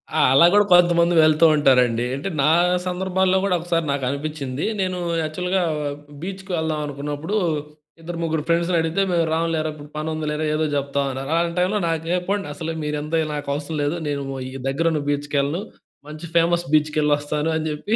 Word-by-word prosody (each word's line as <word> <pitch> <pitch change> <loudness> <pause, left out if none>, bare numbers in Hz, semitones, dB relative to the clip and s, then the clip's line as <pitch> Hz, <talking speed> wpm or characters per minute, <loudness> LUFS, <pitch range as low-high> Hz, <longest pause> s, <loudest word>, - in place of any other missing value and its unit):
ఆ! - - +2
అలా 140 +5 +7
కూడా 205 0 +5
కొంతమంది 175 -1 +5
వెళ్తూ 155 +1 +5
ఉంటారండి. 125 -5 +3
అంటే 140 +8 -4
నా 150 - +4 0.4
సందర్భాల్లో 190 +1 +1
కూడా 180 -2 +2
ఒకసారి 165 -1 -1
నాకు 140 -1 -2
అనిపించింది. 140 -1 -4 0.2
నేను 185 -1 -1 0.3
యాక్చువల్‌గా 180 +4 -1 0.6
బీచ్‌కి 190 +1 -6
వెళ్దాం 160 -1 -1
అనుకున్నప్పుడు 145 +6 -4 0.7
ఇద్దరు, 170 +1 -6
ముగ్గురు 160 -2 -1
ఫ్రెండ్స్‌‌ని 170 +1 +2
అడిగితే, 165 +4 0
మేము 170 -1 +2
రాములేరా 160 -1 0
ఇప్పుడు 145 -1 -12
పని 155 +1 -3
ఉందిలేరా, 155 0 -2
ఏదో 155 - 0
చెప్తాం 140 0 -1
అన్నారు. 135 +1 -5
అలాంటి 170 +1 0
టైమ్‌లో 190 +4 +1
నాకు 165 0 -2
ఏ! - - +2
పోండి 200 -3 -1
అసలు 160 +2 -4
మీరు 150 0 -2
ఎంత 150 +2 -8 0.2
నాకు 145 -1 -5
అవసరం 150 +2 -4
లేదు. 145 +4 0
నేను 140 -1 -2
ఓ - - -5
ఈ - - -10 0.2
దగ్గర 155 +5 -1
ఉన్న 155 -2 -1
బీచ్‌కి 145 0 -2
వెళ్ళను 145 +7 -1 0.5
మంచి 155 +2 -8
ఫేమస్ 170 +1 +3
బీచ్‌కెళ్లొస్తాను, 150 0 +1
అని 155 - -3
చెప్పి 205 +9 -2
155 Hz, 175 wpm, -22 LUFS, 145-175 Hz, 0.7 s, అలా